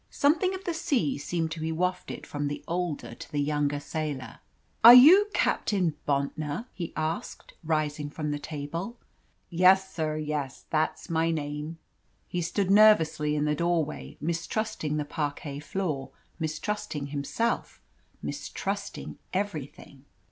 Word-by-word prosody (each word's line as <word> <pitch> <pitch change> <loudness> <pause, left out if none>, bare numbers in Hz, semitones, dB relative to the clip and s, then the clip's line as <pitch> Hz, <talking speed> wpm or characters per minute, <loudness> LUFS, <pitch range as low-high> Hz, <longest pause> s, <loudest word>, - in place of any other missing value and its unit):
Something 350 +6 +2
of 380 - -8
the 345 - -2
sea 285 - 0
seemed 165 +2 -2
to 160 - -5
be 160 +1 -2
wafted 180 +3 -2
from 145 0 -3
the 145 - -4
older 175 -3 -2
to - - -11
the 150 - -3
younger 145 0 0
sailor. 145 -3 -4 0.4
"Are 235 +2 +12
you 350 +11 +9
Captain 185 -6 +1
Bontnor?" 145 +6 -1
he 170 -3 -5
asked, 160 +1 -4
rising 150 -2 -1
from 150 0 -3
the 145 - -2
table. 165 +10 -5 0.5
"Yes, 190 +2 +5
sir, 155 -2 -1
yes! 150 -3 -3
That's 155 +1 -1
my 165 0 +2
name!" 150 0 -3 0.5
He 180 - -2
stood 190 +3 0
nervously 160 -8 +5
in 150 0 +1
the 150 - +2
doorway, 165 -1 -1
mistrusting 165 +1 -2
the 150 - -1
parquet 145 -1 -4
floor, 150 -6 -3 0.3
mistrusting 160 -1 -3
himself, 190 +11 -1 0.4
mistrusting 200 +1 -4
everything. 150 -7 -4
160 Hz, 135 wpm, -28 LUFS, 150-190 Hz, 0.5 s, Are